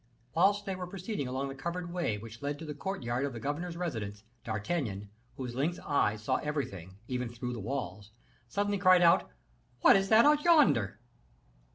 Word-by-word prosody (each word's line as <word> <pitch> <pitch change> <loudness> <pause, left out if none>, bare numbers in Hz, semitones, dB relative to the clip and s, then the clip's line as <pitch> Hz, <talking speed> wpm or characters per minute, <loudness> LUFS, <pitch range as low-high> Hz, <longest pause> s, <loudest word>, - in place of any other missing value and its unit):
Whilst 200 +4 +3
they 195 - -2
were 180 -1 -5
proceeding 185 - -4
along 135 +2 -2
the - - -5
covered 170 +5 -5
way 170 -12 -1
which 115 +1 -10
led 145 0 -2
to 160 - -8
the 150 - -5
courtyard 140 -6 -3
of 140 -2 -2
the 115 - -6
governor's 165 +6 -3
residence, 110 - -4 0.2
D'Artagnan, 105 - -3 0.3
whose 125 -2 -5
lynx 150 +8 -1
eyes 105 -7 0
saw - - +1
everything, 100 - -4
even 125 -2 -2
through 125 +1 -5
the 120 - -5
walls, 105 -4 -4 0.4
suddenly 205 - 0
cried 185 -1 +6
out, 170 +2 +5 0.5
"What - - +8
is 195 0 +2
that 220 +3 +7
out 300 0 +5
yonder?" 270 - +4
140 Hz, 180 wpm, -31 LUFS, 115-180 Hz, 0.5 s, What